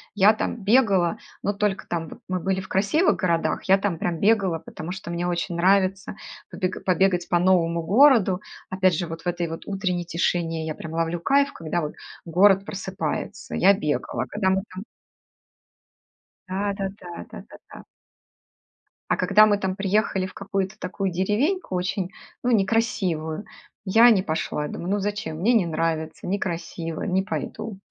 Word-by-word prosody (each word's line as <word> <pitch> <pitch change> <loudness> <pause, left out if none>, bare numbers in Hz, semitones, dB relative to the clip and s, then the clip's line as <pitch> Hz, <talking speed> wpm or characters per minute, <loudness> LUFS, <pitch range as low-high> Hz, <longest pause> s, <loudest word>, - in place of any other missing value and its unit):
Я 205 +2 +6
там 225 +1 -3
бегала, 200 -6 +3 0.3
но 205 - 0
только 200 -1 -1
там, 165 -2 -3
вот, - - -11
мы 185 0 -1
были 190 +1 -1
в 190 - -7
красивых 210 - +2
городах, 170 -3 0
я 195 +1 +5
там 195 -3 -1
прям 170 0 -2
бегала, 200 -6 +2
потому 155 +2 -8
что 185 -2 -6
мне 175 +1 -2
очень 175 0 -2
нравится 190 +2 +2 0.4
побег 185 -1 -3
побегать 185 -1 +2
по 175 - +3
новому 170 -2 +2
городу. 210 - +5 0.3
Опять 185 -2 +2
же, 175 - -2
вот 165 0 -7
в 180 - -8
этой 175 -1 -1
вот 165 0 -7
утренней 185 -3 -2
тишине 165 -1 -1
я 155 - -4
прям 160 - -8
ловлю 165 +1 -1
кайф, 280 +9 +2
когда 165 +1 -3
вот 150 - -4 0.3
город 195 +3 +4
просыпается. 190 -6 -4
Я 195 +2 +6
бегала, 150 -6 -2
когда 205 -2 0
мы 190 0 +1
там 190 - -6 1.7
Да, 200 +2 -1
да, 195 -1 -3
да, 175 -1 -8
да, - - -8
да, - - -11 0.2
да. - - -10 1.3
А - - +3
когда 215 +2 +6
мы 205 -1 +3
там 190 -2 -2
приехали 195 -1 0
в 185 - -8
какую-то 195 0 -3
такую 190 +1 -3
деревеньку 210 - 0
очень, 185 +1 -2 0.3
ну, 245 - +1
некрасивую, 190 -6 0 0.4
я 225 +5 +7
не 200 -4 +4
пошла. 155 -3 -2
Думаю: 175 +5 -5
"Ну, 205 - +1
зачем? 205 -4 -3
Мне 210 +9 +2
не 220 -6 +4
нравится. 160 -1 -2
Некрасиво. 170 -3 -3
Не 190 0 +1
пойду". 210 0 -5
185 Hz, 165 wpm, -24 LUFS, 170-200 Hz, 1.7 s, я